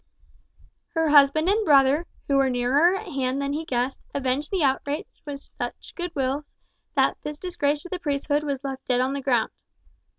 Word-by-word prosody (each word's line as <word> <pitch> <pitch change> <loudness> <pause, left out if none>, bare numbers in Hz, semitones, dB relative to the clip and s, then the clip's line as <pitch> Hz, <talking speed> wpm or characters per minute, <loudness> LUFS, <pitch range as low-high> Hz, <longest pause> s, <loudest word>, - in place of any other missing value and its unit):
Her 325 -1 +2
husband 295 +2 +6
and 425 +3 +3
brother, 285 0 +4 0.2
who 280 - +3
were 270 -1 +3
nearer 265 +9 +3
at 410 - -5
hand 265 -2 -1
than 280 0 -1
he 315 +2 -3
guessed, 250 -1 -1 0.2
avenged 275 +2 -1
the 375 -5 0
outrage 285 +2 0 0.2
with 280 -1 -7
such - - -5
good 350 -1 -5
wills 275 +2 -1 0.5
that - - +3
this 300 0 -5
disgrace 295 -4 -1
to 360 - -9
the 370 - -4
priesthood 290 -1 0
was 280 -2 -3
left 270 -1 -6
dead 250 -1 +2
on 260 +2 +1
the 280 - -3
ground. 245 -4 +1
285 Hz, 185 wpm, -25 LUFS, 270-310 Hz, 0.5 s, husband